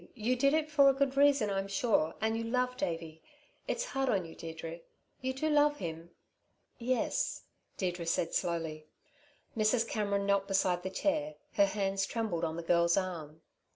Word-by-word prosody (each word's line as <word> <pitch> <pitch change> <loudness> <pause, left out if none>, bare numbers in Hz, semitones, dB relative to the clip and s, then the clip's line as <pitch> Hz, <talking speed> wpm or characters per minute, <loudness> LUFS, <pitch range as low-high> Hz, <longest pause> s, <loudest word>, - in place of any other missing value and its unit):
You 240 +2 0
did 275 +4 +3
it 310 -1 0
for 280 -2 +6
a 270 - +2
good 275 -1 +1
reason, 280 -7 +4
I'm 195 0 -1
sure, 200 -6 +1
and 220 +1 0
you 230 - -2
love 250 +2 0
Davey. 165 -5 -4 0.5
It's - - -1
hard 270 - -1
on 195 -6 +1
you, 165 - -10
Deirdre. 165 0 -7 0.4
You 260 0 -1
do 270 +4 -2
love 295 -1 +4
him?" 165 - -6 0.7
"Yes," 255 - -1 0.3
Deirdre 175 -3 -2
said 165 - 0
slowly. 160 -3 -2 0.7
Mrs. 225 +1 +2
Cameron 200 -2 -1
knelt 200 0 +2
beside 190 -2 +1
the 190 - -4
chair. 155 - -1 0.2
Her 200 -1 +4
hands 195 -1 -1
trembled 215 -8 -2
on 160 -1 -1
the 170 - -5
girl's 170 +1 +3
arm. 160 -5 -4
200 Hz, 170 wpm, -32 LUFS, 170-255 Hz, 0.7 s, for